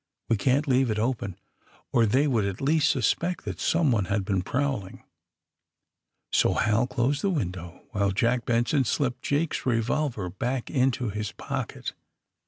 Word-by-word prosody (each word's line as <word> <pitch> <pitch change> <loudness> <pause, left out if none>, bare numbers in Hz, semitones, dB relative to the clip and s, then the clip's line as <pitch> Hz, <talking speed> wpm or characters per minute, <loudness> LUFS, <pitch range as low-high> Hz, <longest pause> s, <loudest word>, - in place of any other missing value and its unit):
We 115 - +4
can^t 135 +7 +2
leave 130 -2 +3
it 110 - 0
open, 110 -5 -1 0.6
or 115 -2 +4
they 130 +8 +3
would 120 -7 +2
at 100 -1 -3
least 150 +3 +3
sus 130 -5 +3
pect 180 +1 -4
that - - -5
someone 135 - +2
had 100 +1 -1
been 95 -2 0
prowling." 125 -3 -2 1.3
So - - +3
Hal 115 +3 +2
closed 130 +3 0
the 200 - +1
window, 90 - -4
while 100 -2 +1
Jack 120 +4 +1
Benson 120 +5 +2
slipped 125 0 -1
Jake's 150 +3 -1
revolver 120 -2 0
back 120 +7 -3
into 130 -3 +1
his 105 0 -3
pocket. - - -5
120 Hz, 155 wpm, -26 LUFS, 105-135 Hz, 1.3 s, We